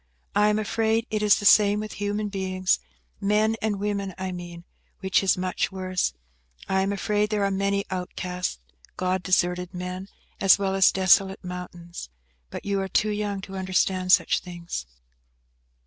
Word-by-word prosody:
I 210 - +5
am 210 - +2
afraid 225 +1 0
it 215 -1 0
is 210 -1 +5
the 205 - -5
same 205 0 +6
with 215 -1 -5
human 205 +1 -1
beings–men 190 - -1
and 210 -2 -1
women, 200 -2 -2
I 190 0 -3
mean–which 175 +2 -4
is 195 -2 +2
much 185 +1 -1
worse. 185 -1 -1 0.5
I 190 0 +2
am 195 +1 0
afraid 210 +1 0
there 210 -2 0
are 200 - +1
many 200 +1 0
outcast, 180 - -3 0.4
God 185 0 0
deserted 180 -1 0
men, 180 +2 -5 0.3
as 195 - +6
well 195 -1 -1
as 195 0 +5
desolate 190 +1 +3
mountains. 175 - -8 0.4
But - - -7
you 200 -1 0
are 190 - -2
too 210 +3 +2
young 205 -1 -2
to 195 0 -9
understand 185 0 0
such - - +4
things." 170 - -6
190 Hz, 155 wpm, -25 LUFS, 180-205 Hz, 0.5 s, same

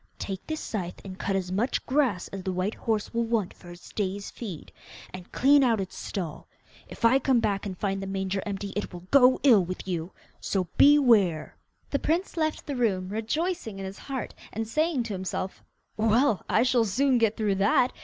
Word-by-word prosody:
'Take 190 -2 -6
this 315 0 -3
scythe 180 -5 -4
and 185 -1 -8
cut 195 - -1
as 185 -1 -2
much 215 +7 0
grass 255 -10 +1
as 195 - -6
the 190 - -2
white 185 +4 -1
horse 220 -2 -2
will 235 0 +1
want 225 -5 -1
for 175 - -15
its 175 0 -12
day's 200 -1 -3
feed, 195 -10 -8 0.4
and 185 -1 -9
clean 280 +2 +5
out 230 -4 +3
its 190 -1 -5
stall. 165 -5 -5 0.4
If - - -3
I 260 +4 +6
come 265 -3 +3
back 200 -2 -1
and 185 -2 -6
find 195 0 -2
the 195 - -5
manger 190 0 -2
empty 200 -1 -4
it 205 - -3
will 175 -1 -9
go 260 -2 +6
ill 230 -9 +6
with 185 +2 -6
you. 175 -1 -3 0.3
So 185 -3 -1
beware!' 230 - +5 0.4
The 280 - +1
prince 340 +5 -1
left 315 -2 -1
the 285 - -4
room, 195 -7 0
rejoicing 225 - -2
in 195 - -5
his 190 +1 -7
heart, 265 -4 -5 0.2
and 225 +1 -3
saying 305 +1 +1
to 225 -3 -5
himself, 185 0 -4 0.3
'Well, 225 +1 +3
I 225 - +4
shall 250 -2 +3
soon 255 +5 +2
get 225 -1 +2
through 210 -3 +1
that! 245 +5 +3
210 Hz, 200 wpm, -27 LUFS, 190-250 Hz, 0.4 s, I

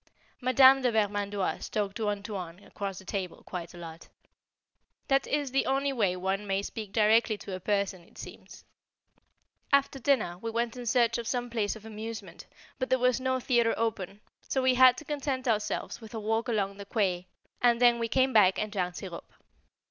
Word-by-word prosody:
Madame 260 +2 +6
de 250 -2 +2
Vermandoise 205 -2 -1
talked 205 -2 -2
to 220 -2 -1
"Antoine" 200 -4 -5
across 200 -2 -6
the 190 - -11
table 185 -3 -4
quite 175 -2 -6
a - - -13
lot. 165 -1 -10 1.0
That 270 0 +2
is 290 -2 -1
the 270 - +1
only 275 +1 +1
way 200 -8 +1
one 190 +3 -2
may 195 0 0
speak 215 -1 -6
directly 220 +1 +3
to 200 - -8
a - - -6
person, 200 -1 -1
it - - -21
seems. - - -11 1.1
After 280 -1 +2
dinner 235 -10 +1
we 230 - -4
went 230 +1 -2
in 245 -1 -7
search 235 0 +2
of 230 - -5
some 245 -1 -2
place 220 -3 -1
of 220 0 -12
amusement, 220 +1 -8 0.3
but 255 - -2
there 260 - +4
was 250 0 +2
no 260 0 0
theatre 235 -2 +2
open, 210 -3 -3 0.3
so 265 - 0
we 260 0 +4
had 255 0 +6
to 310 - -9
content 280 -3 -3
ourselves 215 +1 -1
with 220 0 -10
a - - -3
walk 225 +3 -1
along 200 -3 -1
the 200 - -8
quay, 185 -4 -1 0.3
and 240 -1 +4
then 240 -1 +5
we 230 - -1
came 260 +3 +2
back 190 -3 +5
and 215 0 -2
drank 180 -3 -2
sirop. 180 -4 -8
220 Hz, 190 wpm, -29 LUFS, 200-250 Hz, 1.1 s, Madame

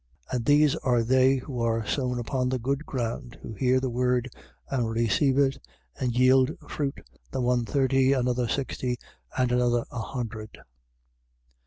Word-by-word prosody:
4:20. - - -1
And 120 -2 -2
these 145 0 +4
are 120 -3 +1
they 130 +2 +4
who 130 -1 -4
are 115 -1 0
sown 125 +1 -1
upon 125 +2 -1
the 130 - 0
good 135 +5 -2
ground, 120 -1 -4
who 115 - -7
hear 130 +3 +2
the 130 -1 -2
word, 125 0 0 0.4
and 120 -4 -1
receive 115 +4 +2
it, 135 -1 +2 0.4
and 125 -2 -1
yield 130 +2 +4
fruit, 140 -2 -3 0.3
the - - -4
one 125 -1 +1
thirty, 135 0 +2
another 125 -2 +1
sixty, 125 -1 -2 0.4
and 125 -1 +2
another 120 -1 +2
a 120 - -4
hundred. 110 -3 -6
125 Hz, 160 wpm, -27 LUFS, 120-135 Hz, 0.4 s, these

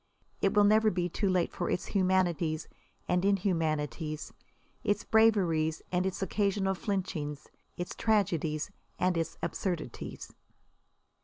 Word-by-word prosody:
It 195 - +2
will 205 - +6
never 215 +1 +5
be 180 -2 -1
too 200 +3 0
late 180 -2 +1
for - - -2
its - - -1
humanities 180 -5 +1 0.4
and 180 0 +2
inhumanities, 160 - 0 0.5
its 205 0 +1
braveries 180 -8 +3
and 180 +1 +1
its 190 +1 -3
occasional 195 -1 +1
flinchings, 180 -7 -3 0.3
its 175 - -4
tragedies 170 -7 0 0.3
and 180 0 +2
its 165 -1 -2
absurdities. 175 - -4
180 Hz, 120 wpm, -30 LUFS, 160-200 Hz, 0.5 s, will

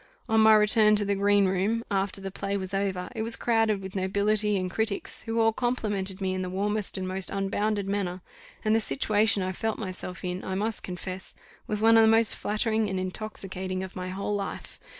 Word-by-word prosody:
On 220 0 +3
my 220 0 +7
return 215 0 +5
to 205 0 +1
the 200 - +1
green 200 0 +3
room, 195 +5 0
after 195 0 0
the 195 0 -6
play 200 +1 -2
was 190 0 -5
over, 195 -2 -1
it 220 - -2
was 230 +1 0
crowded 225 -4 +1
with 190 0 -8
nobility 205 +2 +1
and 185 -1 -2
critics, 220 0 -2
who 225 0 -2
all 225 0 +4
complimented 205 -6 -1
me 190 -1 -1
in 185 - -2
the 185 - -3
warmest 205 +2 0
and 185 -1 -3
most 190 0 -2
unbounded 200 +1 -1
manner; 190 -2 -2 0.4
and 215 0 +3
the - - +4
situation 205 +5 +2
I 185 - -1
felt 220 +4 -2
myself 185 -3 -6
in, 180 +1 -3
I 190 - -3
must 215 +2 -1
confess, 185 +1 -6 0.3
was 210 0 -1
one 225 0 +7
of - - +8
the 220 - +6
most 225 0 +4
flattering 215 0 0
and 190 -1 -2
intoxicating 185 -1 -4
of 190 - -8
my 185 0 -4
whole 200 +2 -3
life. 200 -1 -5
200 Hz, 210 wpm, -27 LUFS, 190-215 Hz, 0.4 s, of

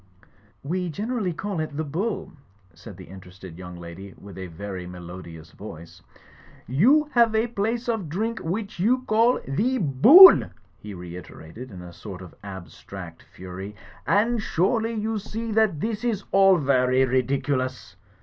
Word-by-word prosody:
"We 180 +5 -2
generally 210 - -2
call 195 +2 -4
it 155 -2 -4
The 155 - -1
Bull," 185 +9 -3 0.4
said 105 -6 -12
the 95 - -10
interested 95 -2 -12
young 90 -1 -9
lady, 85 +3 -10
with 100 0 -12
a 95 -1 -7
very 90 +1 -7
melodious 85 -2 -10
voice. 85 -3 -11 0.7
''You 270 - +3
have 235 -3 +3
a 220 +1 +2
place 230 +2 -2
of 220 -9 -2
drink, 220 +8 -2
which 200 +4 -4
you 250 +7 +2
call 230 +1 +3
The 225 - 0
Bool," 235 - +8 0.3
he 105 -2 -9
reiterated 90 +5 -10
in 90 -5 -10
a 90 -1 -11
sort 95 0 -9
of 90 - -12
abstract 95 -2 -10
fury, 95 +3 -9 0.3
"and 225 +3 +2
surely 225 +5 0
you 220 0 -2
see 225 +2 -6
that 215 -7 +2
this 220 0 -3
is 220 -5 -1
all 195 -1 +5
vary 130 -3 +2
ridiculous 130 +1 -1
145 Hz, 150 wpm, -24 LUFS, -, 0.7 s, Bool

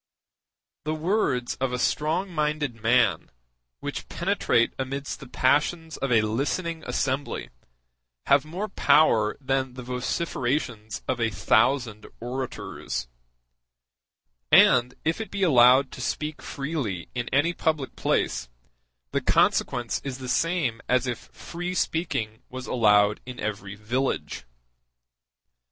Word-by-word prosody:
The 155 +1 -2
words 155 - 0
of 135 -1 +1
a 125 - -1
strong 160 +9 0
minded 150 -6 -1
man, 120 +2 +2 0.5
which - - -5
penetrate 115 0 +1
amidst 135 +1 -4
the 135 - -10
passions 155 +6 +1
of 135 - -2
a 115 -2 +5
listening 155 +9 -2
assembly, 135 +1 -2 0.7
have 140 0 +4
more 175 +7 -4
power 115 - +3
than 130 -1 -1
the 125 - -7
vociferations 125 -3 -2
of 125 -2 -1
a 115 - +2
thousand 110 +3 +1
orators; 125 - -4 1.4
and 125 +1 +6
if 165 +7 0
it 220 - -6
be 200 -1 -2
allowed 130 -3 +6
to - - -8
speak 150 +4 -3
freely 140 - -4
in 120 -1 -3
any 145 +6 +2
public 155 -5 -1
place, - - 0 0.6
the - - 0
consequence 120 -2 +1
is 135 -2 -4
the 130 -1 -7
same 150 -6 0
as 125 0 +3
if 125 -2 -5
free 175 +2 -5
speaking 115 -12 -1
was 130 0 -7
allowed 105 -3 +3
in 125 -1 -7
every 100 -1 -4
village. 120 - -2
130 Hz, 120 wpm, -26 LUFS, 120-155 Hz, 1.4 s, and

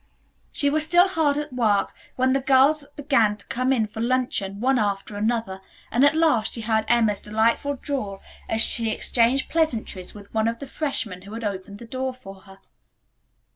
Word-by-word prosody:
She 285 -1 +1
was 310 +1 +2
still 350 +4 +5
hard 315 -6 +1
at 295 -2 -4
work 215 -5 +1 0.2
when 260 0 +2
the 270 - +2
girls 280 +2 +3
began 235 -8 +2
to 200 - -12
come 255 +2 -1
in 235 -5 +2
for 215 +1 -7
luncheon, 235 -5 -1
one 260 +2 +2
after 205 0 -2
another, 210 -3 -2 0.3
and 245 +4 +2
at 285 +2 +5
last 305 -9 +2
she 230 - -6
heard 220 0 0
Emma's 225 -4 +2
delightful 225 +7 0
drawl 230 -8 -4 0.3
as 225 - +3
she 230 0 +4
exchanged 240 +4 +1
pleasantries 230 - -2
with 200 -1 -13
one 220 0 +1
of 230 0 -1
the 280 - -8
freshmen 255 - -3
who 200 +3 -11
had 230 - -6
opened 200 -1 -5
the 235 - -11
door 260 +2 -4
for 200 -6 -11
her. 195 0 -16
235 Hz, 185 wpm, -24 LUFS, 210-275 Hz, 0.3 s, still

